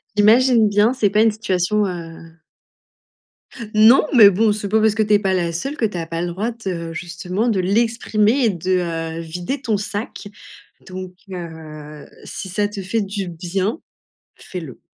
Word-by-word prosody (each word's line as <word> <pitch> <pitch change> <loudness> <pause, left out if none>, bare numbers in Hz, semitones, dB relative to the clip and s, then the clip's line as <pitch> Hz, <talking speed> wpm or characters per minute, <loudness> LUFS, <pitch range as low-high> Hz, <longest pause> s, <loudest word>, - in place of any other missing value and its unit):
J'imagine 225 +2 +5
bien, 210 +4 +3
c'est 215 -6 +1
pas 210 +2 +2
une 225 -1 +4
situation, 210 -1 0
heu 165 -2 -8 1.4
Non, 220 +7 +6
mais 215 -6 +9
bon, 210 +3 +2
c'est 205 -1 -3
pas 220 +2 +2
parce 220 -1 +3
que 220 - +2
tu 210 - +1
es 205 - +5
pas 195 -2 0
la 175 -2 0
seule 275 - -4
que 225 - +1
tu 205 -4 -3
as 165 - -3
pas 165 +1 -4
le 175 - -2
droit 200 +7 -3
de 170 -3 -3
justement 180 +5 -3
de 215 -5 +1
l'exprimer 225 +4 +1
et - - +4
de 170 -3 -2
vider 175 - -5
ton 225 -6 0
sac. 205 +1 -5 0.6
Donc 185 -1 -8 0.2
heu, 155 -4 -9 0.2
si 190 - -7
ça 205 +3 0
te 205 -1 -7
fait 215 +4 -1
du 195 -1 -4
bien, 185 - -3 0.6
fais-le. 165 -9 -9
195 Hz, 175 wpm, -20 LUFS, 175-215 Hz, 1.4 s, mais